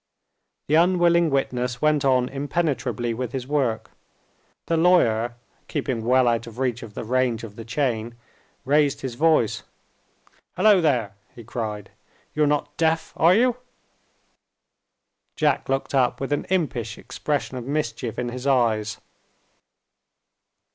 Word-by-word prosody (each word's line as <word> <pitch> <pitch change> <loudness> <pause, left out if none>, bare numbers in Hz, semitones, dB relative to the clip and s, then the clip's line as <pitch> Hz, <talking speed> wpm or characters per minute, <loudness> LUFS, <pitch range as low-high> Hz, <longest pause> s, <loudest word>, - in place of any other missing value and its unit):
The 150 - -2
unwilling 170 0 +4
witness 125 -3 -1
went 150 0 +2
on 130 -2 +3
impenetrably 135 -5 -2
with 125 0 -4
his 130 -2 -3
work. 125 -6 -1 0.7
The 165 - 0
lawyer 120 -10 +3 0.3
(keeping 130 -6 -2
well 125 +2 +3
out 115 0 0
of 115 0 -11
reach 125 -2 -1
of 110 -3 -10
the - - -4
range 120 -1 0
of 105 -3 -9
the 115 - -8
chain) 120 -2 -2 0.5
raised 145 0 +2
his 130 -2 -4
voice. 155 -4 +2 0.9
"Hullo, 210 -4 +5
there!" 125 -10 +1 0.2
he 120 - -10
cried, 105 -3 -5 0.4
"you're 150 -1 +2
not 145 0 -1
deaf, 160 0 0
are 170 +3 +5
you?" 245 +2 +3 1.8
Jack 150 -4 +1
looked 135 +1 -1
up, 125 -2 +2
with 135 +1 -2
an 145 - -2
impish 140 - -2
expression 145 -3 -3
of 120 - -6
mischief 140 -5 -3
in 120 -1 -2
his 125 +2 -5
eyes. 110 -5 +1
130 Hz, 135 wpm, -23 LUFS, 120-150 Hz, 1.8 s, Hullo